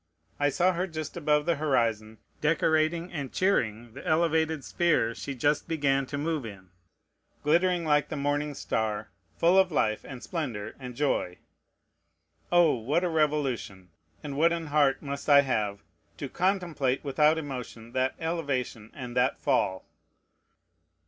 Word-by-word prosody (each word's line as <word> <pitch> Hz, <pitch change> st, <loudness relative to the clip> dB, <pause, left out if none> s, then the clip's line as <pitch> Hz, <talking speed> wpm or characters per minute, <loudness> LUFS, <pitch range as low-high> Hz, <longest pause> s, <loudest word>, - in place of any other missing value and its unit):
I 145 Hz, 0 st, +3 dB
saw 180 Hz, +6 st, +2 dB
her 180 Hz, +2 st, -1 dB
just 155 Hz, -3 st, -6 dB
above 150 Hz, -3 st, +1 dB
the 170 Hz, -2 st, +1 dB
horizon, 115 Hz, -7 st, 0 dB, 0.2 s
decorating 160 Hz, +2 st, +1 dB
and 140 Hz, -5 st, -4 dB
cheering 120 Hz, -, 0 dB
the -, -, -9 dB
elevated 160 Hz, -2 st, +1 dB
sphere 160 Hz, -10 st, +1 dB
she 140 Hz, +3 st, -6 dB
just 145 Hz, +4 st, +1 dB
began 140 Hz, -4 st, +1 dB
to 140 Hz, -, -4 dB
move 155 Hz, 0 st, -1 dB
in, 95 Hz, -5 st, -10 dB, 0.7 s
glittering 175 Hz, +3 st, +2 dB
like 150 Hz, -2 st, +2 dB
the -, -, -4 dB
morning 145 Hz, +1 st, -1 dB
star, 110 Hz, -3 st, -2 dB, 0.3 s
full 175 Hz, +3 st, +5 dB
of 190 Hz, -1 st, +3 dB
life 110 Hz, -7 st, +1 dB
and 130 Hz, -2 st, -9 dB
splendor 120 Hz, -, -4 dB
and 125 Hz, -2 st, -8 dB
joy. 125 Hz, -10 st, 0 dB, 1.1 s
Oh! 175 Hz, -3 st, +5 dB
what 135 Hz, +9 st, 0 dB
a 180 Hz, -, +1 dB
revolution! 140 Hz, -, -1 dB, 0.3 s
and 145 Hz, -2 st, -5 dB
what 165 Hz, +4 st, +4 dB
an 170 Hz, -1 st, -2 dB
heart 145 Hz, -2 st, +2 dB
must 140 Hz, +1 st, -5 dB
I 140 Hz, -1 st, +8 dB
have, 105 Hz, -8 st, -2 dB, 0.3 s
to 140 Hz, -, -4 dB
contemplate 170 Hz, -7 st, 0 dB
without 150 Hz, +2 st, +3 dB
emotion 125 Hz, -6 st, -6 dB
that 130 Hz, +1 st, 0 dB
elevation 140 Hz, -9 st, -3 dB
and 125 Hz, -3 st, -7 dB
that 125 Hz, +1 st, +2 dB
fall! 95 Hz, -1 st, 0 dB
145 Hz, 145 wpm, -28 LUFS, 125-160 Hz, 1.1 s, I